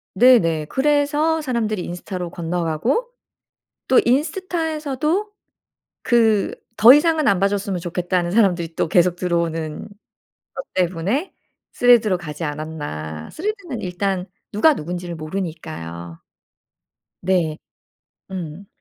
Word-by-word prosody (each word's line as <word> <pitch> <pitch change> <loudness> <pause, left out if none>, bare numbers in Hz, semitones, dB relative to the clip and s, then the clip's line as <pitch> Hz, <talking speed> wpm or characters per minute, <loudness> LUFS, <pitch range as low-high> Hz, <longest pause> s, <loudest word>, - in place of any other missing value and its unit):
네네 180 -10 +5
그래서 295 - +1
사람들이 225 -8 -2
인스타로 175 0 -5
건너가고 175 - -1 0.8
또 260 - +6
인스타에서도 315 - -1 0.7
그 225 -4 +3 0.3
더 235 +4 +11
이상은 310 0 +3
안 195 - +3
봐 195 - +4
줬으면 200 -2 -2
좋겠다는 175 0 -1
사람들이 180 -6 +2
또 - - 0
계속 175 +1 +3
들어오는 165 -3 -2 0.7
것 265 - -5
때문에 185 - -1 0.4
스레드로 235 -6 +4
가지 165 -2 -6
않았나. 145 - -5
스레드는 370 - -4
일단 185 0 -2 0.3
누가 300 +10 +4
누군지를 175 - -5
모르니까요. 155 - -6 1.0
네. 175 -4 +1 0.7
음. 180 0 -6
185 Hz, 260 characters per minute, -21 LUFS, 165-260 Hz, 1.0 s, 더